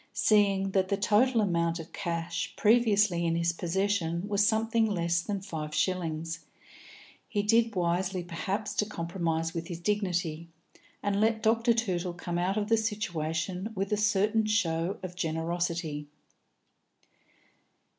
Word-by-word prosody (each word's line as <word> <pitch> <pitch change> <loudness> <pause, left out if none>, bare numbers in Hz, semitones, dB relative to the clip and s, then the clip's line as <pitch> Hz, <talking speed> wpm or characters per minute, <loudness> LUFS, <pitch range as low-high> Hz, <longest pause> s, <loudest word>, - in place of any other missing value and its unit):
Seeing 200 -2 +3
that 190 -1 +2
the 200 - 0
total 220 +4 +3
amount 170 -4 +1
of 165 -1 -9
cash 170 -1 -3
previously 210 -5 +3
in 165 -1 +1
his 170 0 +1
possession 175 0 -1
was 205 0 +2
something 225 +1 +2
less 170 -4 0
than 200 +1 -3
five 155 -5 -5
shillings, 165 -3 -1 0.9
he 205 -2 -1
did 225 +1 +3
wisely, 180 +1 0
perhaps, 190 +4 -3
to 210 - +2
compromise 165 -3 -2
with 165 0 -4
his 170 -3 -6
dignity, 175 -4 -1 0.5
and 205 0 +1
let 220 0 +2
Dr. 230 +2 +3
Tootle 185 -6 -1
come 175 0 -3
out 185 +4 0
of 210 -1 0
the 225 +1 +4
situation 185 -3 -2
with 195 +1 -2
a - - +4
certain 210 +1 +2
show 180 -4 0
of 185 -1 -5
generosity. 165 -2 -2
185 Hz, 135 wpm, -29 LUFS, 170-210 Hz, 0.9 s, the